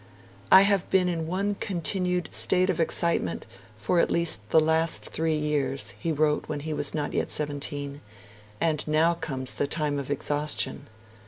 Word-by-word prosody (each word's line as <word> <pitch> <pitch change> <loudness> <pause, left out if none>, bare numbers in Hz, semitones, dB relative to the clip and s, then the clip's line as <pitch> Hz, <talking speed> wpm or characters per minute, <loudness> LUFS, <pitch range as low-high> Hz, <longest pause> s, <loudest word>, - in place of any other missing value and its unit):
'I 190 - +9
have 200 -2 +2
been 185 -1 +3
in 165 -2 -2
one 195 +4 -1
continued 180 -1 -1
state 185 0 +2
of 175 - -5
excitement 165 - 0 0.3
for 115 +11 0
at - - +2
least 165 -11 +1
the 160 - +5
last 160 +1 +1
three 160 -1 0
years,' 145 -3 -1
he 165 - -2
wrote 150 0 +1
when 150 -2 -3
he 155 +1 -4
was 145 0 -1
not 150 -1 -2
yet - - -1
seventeen, 145 -1 -2 0.6
'and 155 -3 0
now 155 +3 +3
comes 140 -6 -4
the 145 - -1
time 150 -1 -1
of 140 - -6
exhaustion.' 145 -1 -1
155 Hz, 165 wpm, -26 LUFS, 145-170 Hz, 0.6 s, I